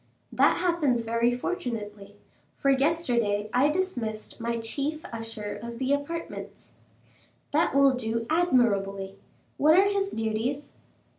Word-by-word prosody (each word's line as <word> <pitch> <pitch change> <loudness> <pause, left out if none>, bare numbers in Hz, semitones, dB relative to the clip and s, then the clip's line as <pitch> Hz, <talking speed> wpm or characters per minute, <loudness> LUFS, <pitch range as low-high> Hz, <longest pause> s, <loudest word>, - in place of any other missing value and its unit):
"That - - +4
happens 300 -10 +1
very 230 +1 +1
fortunately, 210 - -5 0.4
for 275 - +2
yesterday 240 -8 +1
I 265 +4 +4
dismissed 250 - -3
my 235 0 -2
chief 285 +8 -3
usher 225 -2 -6
of 235 0 -7
the 265 +2 +1
apartments." 310 +4 -5 0.8
"That 310 0 +2
will 275 -1 +6
do 230 -2 -2
admirably. 200 - +1 0.4
What 310 +3 +5
are 390 +1 +6
his 400 -1 0
duties?" 225 - -2
245 Hz, 120 wpm, -27 LUFS, 225-300 Hz, 0.8 s, will